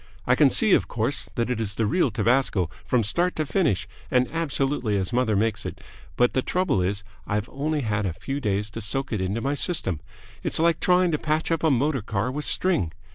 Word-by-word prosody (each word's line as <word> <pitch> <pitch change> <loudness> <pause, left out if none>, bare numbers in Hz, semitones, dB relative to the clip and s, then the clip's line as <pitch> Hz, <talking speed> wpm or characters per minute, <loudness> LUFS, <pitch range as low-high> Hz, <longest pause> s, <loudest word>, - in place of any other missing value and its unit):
I - - +4
can - - +5
see, - - +3
of - - +3
course, - - -1
that 120 +1 -1
it 115 -2 -1
is 105 -2 -4
the 110 - 0
real 175 - +2
tabasco 110 - +1
from 125 -3 +1
start 175 - +1
to 155 - -1
finish, 145 - 0 0.2
and 125 0 +2
absolutely 135 -8 0
as 95 +1 -2
mother 120 -3 +2
makes 110 +2 0
it, - - -6 0.4
but 125 0 +3
the 130 - +1
trouble 180 - 0
is 100 +3 -1 0.2
I've 105 +2 -1
only 150 +2 -2
had 105 -4 -1
a 85 - -2
few 135 - -4
days 105 -4 -1
to 115 - -6
soak 135 +5 -2
it 105 - -1
into 100 +5 -2
my 140 +3 0
system. 145 - +2 0.4
It's - - +1
like 165 0 +2
trying 180 -1 +3
to 150 - 0
patch 155 +2 -1
up 165 -1 0
a 160 - +4
motor 135 0 +1
car 105 +3 -2
with 150 +3 -3
string. 165 - +1
125 Hz, 220 wpm, -25 LUFS, 105-150 Hz, 0.4 s, can